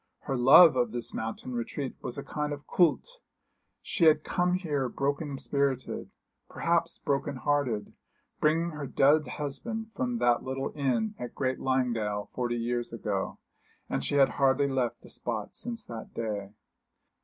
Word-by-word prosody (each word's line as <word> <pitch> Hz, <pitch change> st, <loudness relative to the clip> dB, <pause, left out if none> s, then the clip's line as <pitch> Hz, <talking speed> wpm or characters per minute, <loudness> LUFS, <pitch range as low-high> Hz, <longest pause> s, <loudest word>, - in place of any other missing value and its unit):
Her 135 Hz, -, -2 dB
love 135 Hz, +6 st, +8 dB
of 120 Hz, -3 st, +1 dB
this 120 Hz, -1 st, -2 dB
mountain 115 Hz, +3 st, -4 dB
retreat 125 Hz, +3 st, -4 dB
was 120 Hz, -, -6 dB
a 140 Hz, -, -4 dB
kind 150 Hz, -1 st, -3 dB
of 145 Hz, 0 st, -8 dB
culte. 330 Hz, -, +1 dB, 0.6 s
She 170 Hz, -, +1 dB
had 155 Hz, -1 st, +5 dB
come 180 Hz, 0 st, +1 dB
here 145 Hz, -8 st, -1 dB
broken 140 Hz, +2 st, -2 dB
spirited, 140 Hz, -2 st, -1 dB, 0.4 s
perhaps -, -, 0 dB
broken 140 Hz, 0 st, -1 dB
hearted, 130 Hz, -5 st, 0 dB, 0.5 s
bringing 165 Hz, +3 st, +2 dB
her 150 Hz, -3 st, -5 dB
dead 150 Hz, +4 st, +4 dB
husband 220 Hz, -, -4 dB
from 125 Hz, -2 st, -1 dB
the 120 Hz, 0 st, +4 dB
little 135 Hz, +1 st, -3 dB
inn 150 Hz, -, 0 dB
at 120 Hz, -, -6 dB
Great 130 Hz, -1 st, -1 dB
Langdale 115 Hz, -6 st, 0 dB
forty 120 Hz, -1 st, -1 dB
years 120 Hz, +1 st, -2 dB
ago, 105 Hz, -4 st, -3 dB, 0.5 s
and 70 Hz, -, -1 dB
she 70 Hz, -, -1 dB
had 140 Hz, -1 st, +6 dB
hardly 140 Hz, 0 st, +2 dB
left 125 Hz, -3 st, -1 dB
the -, -, -14 dB
spot 110 Hz, -4 st, -4 dB
since 235 Hz, -1 st, -3 dB
that 115 Hz, -1 st, -8 dB
day. 105 Hz, -4 st, -3 dB
135 Hz, 155 wpm, -29 LUFS, 120-150 Hz, 0.6 s, love